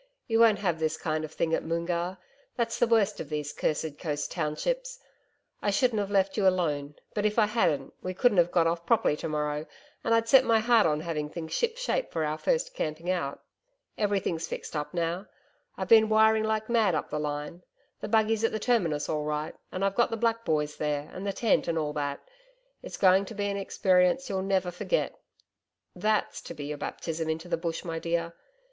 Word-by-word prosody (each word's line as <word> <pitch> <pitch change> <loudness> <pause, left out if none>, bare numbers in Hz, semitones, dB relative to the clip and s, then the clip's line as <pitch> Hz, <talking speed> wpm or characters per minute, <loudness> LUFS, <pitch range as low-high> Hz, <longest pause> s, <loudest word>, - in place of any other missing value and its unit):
You 225 -1 +1
won't 225 -3 +6
have 175 -5 -1
this 160 0 0
kind 155 -1 -2
of 155 - -6
thing 165 0 -1
at - - +1
Moongarr. 170 +2 -2 0.4
That's 230 -2 -1
the 240 - +4
worst 225 -4 +2
of 145 - -6
these 150 -1 -3
cursed 155 -1 -2
coast 145 -4 -3
townships. - - -2 0.6
I - - 0
shouldn't 220 +2 +2
have 200 -1 -2
left 195 0 +1
you 200 -2 +3
alone, 150 -6 0 0.2
but 210 - -1
if 210 +1 +1
I 220 - +6
hadn't, 165 - 0
we 185 0 -4
couldn't 210 -2 +3
have 175 0 +4
got 170 -2 +3
off 165 +1 0
properly 225 -7 +2
to - - -4
morrow, 150 0 -2 0.4
and 230 - +3
I'd 230 0 +1
set 265 +2 +7
my 230 -2 +4
heart 225 -3 +4
on 150 -1 0
having 155 -3 -3
things 160 0 -6
ship 475 0 0
shape - - -1
for 160 -1 -1
our 155 +1 -2
first - - 0
camping 160 - -2
out. 140 -7 -3 0.5
Everything's 195 -5 -1
fixed - - -6
up 150 -1 -3
now 175 +3 -2 0.5
I've - - -3
been 220 -1 +7
wiring 220 0 +4
like 220 0 -1
mad 220 -7 +3
up 150 - -3
the 150 - -1
line.... 150 +3 -4 0.4
The - - -5
buggy's 220 0 +2
at 225 - +3
the - - -1
Terminus 180 -12 +1
all 150 -1 -1
right, 150 +1 -2 0.2
and 185 +2 -1
I've 195 - +1
got 240 - +2
the 225 - -3
black 230 0 0
boys 150 -3 -1
there, 150 -1 -2
and 190 +2 -5
the - - +1
tent 225 +2 +2
and 165 -1 0
all 150 -2 -1
that. 145 -1 -3 0.6
It's - - -7
going 190 +1 +5
to 220 - -9
be 205 0 -2
an 200 0 -1
experience 185 +4 +2
you'll 190 -1 -1
never 190 -2 0
forget. - - -1 0.8
THAT'S 215 0 0
to - - -7
be 145 -1 -6
your 150 0 -5
baptism 160 -1 -4
into 160 +2 -3
the 175 - +1
Bush, 165 0 -3
my 165 -1 -3
dear 170 0 -2
180 Hz, 210 wpm, -28 LUFS, 155-220 Hz, 0.8 s, set